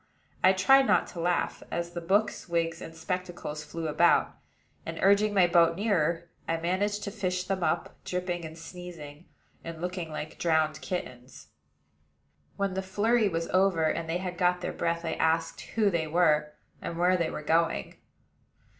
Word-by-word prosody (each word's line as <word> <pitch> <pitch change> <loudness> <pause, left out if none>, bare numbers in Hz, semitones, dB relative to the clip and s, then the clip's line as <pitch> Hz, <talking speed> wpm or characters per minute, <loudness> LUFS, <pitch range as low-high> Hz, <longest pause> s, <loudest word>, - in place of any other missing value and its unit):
I 185 - +7
tried 270 +8 +5
not - - +4
to 170 - -8
laugh, 175 +1 0
as 170 0 -3
the 175 - -5
books, 195 +3 0
wigs, 165 -1 -1
and 165 - -9
spectacles 175 -3 -4
flew 165 +1 -5
about; 170 +3 +3 0.5
and, - - -6
urging 200 +2 +4
my 190 -3 +5
boat 170 -1 +4
nearer, 170 -5 0 0.2
I 165 - 0
managed 200 +5 -1
to 200 - -4
fish 185 -3 -2
them 190 -1 -2
up, 170 - -1
dripping 180 -1 -3
and 160 0 -8
sneezing, 165 -3 -10 0.4
and 165 -1 -7
looking 180 -1 -4
like 155 0 -6
drowned 160 -2 +1
kittens. 130 -8 -6 1.1
When 200 -1 -1
the 190 - -1
flurry 210 +3 +2
was 165 -1 -2
over, 185 -3 +3
and 165 +1 0
they 165 - 0
had 180 -1 -5
got 180 0 +2
their - - -3
breath, 170 0 -1
I 160 - -1
asked 165 +1 0 0.2
who 210 -3 +4
they 165 -3 0
were, 155 -2 +2 0.3
and 170 - -5
where 180 +2 +3
they 170 -3 0
were 150 - -6
going. 160 - 0
170 Hz, 170 wpm, -28 LUFS, 165-185 Hz, 1.1 s, I